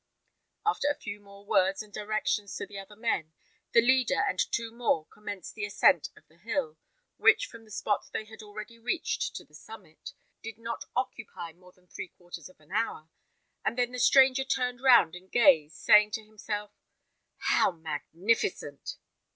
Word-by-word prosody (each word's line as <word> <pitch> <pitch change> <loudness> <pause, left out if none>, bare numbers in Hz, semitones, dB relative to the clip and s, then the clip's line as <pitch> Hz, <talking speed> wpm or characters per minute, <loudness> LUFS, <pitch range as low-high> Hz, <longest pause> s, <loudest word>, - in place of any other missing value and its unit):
After 425 -8 +1
a 290 - 0
few 205 -1 -6
more 200 0 -16
words 195 +1 +2
and 210 -1 -19
directions 210 -1 -1
to - - -4
the 200 0 -8
other 195 +2 -11
men, 190 -8 -1 0.4
the 230 - +6
leader 260 0 +3
and 185 - -2
two 230 -1 0
more 230 -9 0
commenced 205 -2 -8
the 210 - -6
ascent 195 -4 +3
of 155 - -20
the 160 +2 -26
hill, 170 -6 -2 0.4
which, 430 - +5
from 230 -1 -13
the - - -19
spot 210 - -1
they 215 - -3
had 220 0 -12
already 215 +2 -9
reached 345 - -2
to - - -7
the - - -30
summit, - - -11 0.3
did 225 -1 -7
not 230 0 -5
occupy 195 -9 -4
more 180 +2 -19
than 180 0 -29
three 180 - -7
quarters 175 -2 -11
of 185 - -21
an 150 +2 -22
hour, 200 -7 -2 0.5
and 235 - -1
then 245 -1 +1
the 250 - -5
stranger 265 +1 +6
turned 250 -2 -1
round 235 -11 +6
and 185 +1 -13
gazed, 170 -10 +5
saying 210 0 +6
to 220 +1 -4
himself, 210 -1 -5 0.7
"How - - +3
magnificent!" 160 0 -2
210 Hz, 175 wpm, -29 LUFS, 180-230 Hz, 0.7 s, the